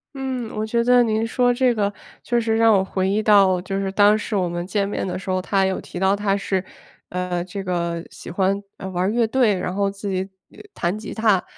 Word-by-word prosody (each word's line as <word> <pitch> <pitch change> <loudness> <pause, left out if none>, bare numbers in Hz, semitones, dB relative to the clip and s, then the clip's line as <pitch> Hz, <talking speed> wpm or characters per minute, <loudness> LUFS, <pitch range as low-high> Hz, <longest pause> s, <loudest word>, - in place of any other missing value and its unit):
嗯， 260 -4 -4
我 215 - -2
觉 235 +2 0
得 245 +1 +5
您 220 -1 +1
说 245 +1 +2
这 245 0 +2
个 205 -2 0 0.3
确 240 0 0
实 225 -1 0
让 225 -1 +5
我 190 - +2
回 190 0 -1
忆 210 +2 +1
到 195 -4 +5
就 195 +1 -3
是 195 -1 -2
当 205 +1 +5
时 215 0 -3
我 185 -2 +1
们 175 0 -4
见 200 -1 0
面 205 - -3
的 180 - -3
时 190 - -10
候， 185 0 0
他 195 0 +1
有 190 0 -1
提 - - -9
到 190 +1 +3
他 200 -1 0
是， 190 -2 -1 0.5
呃， 180 -1 -2
这 195 +2 -6
个 170 -2 -2
喜 - - -10
欢， 195 +3 0 0.2
呃， 190 - -7
玩 185 +3 0
乐 235 0 +2
队， 225 -3 +2
然 180 0 -3
后 200 0 +1
自 200 +1 -7
己 190 0 -2 0.5
弹 175 +3 -1
吉 220 - -7
他， 215 -4 +3
200 Hz, 250 characters per minute, -22 LUFS, 185-220 Hz, 0.5 s, 得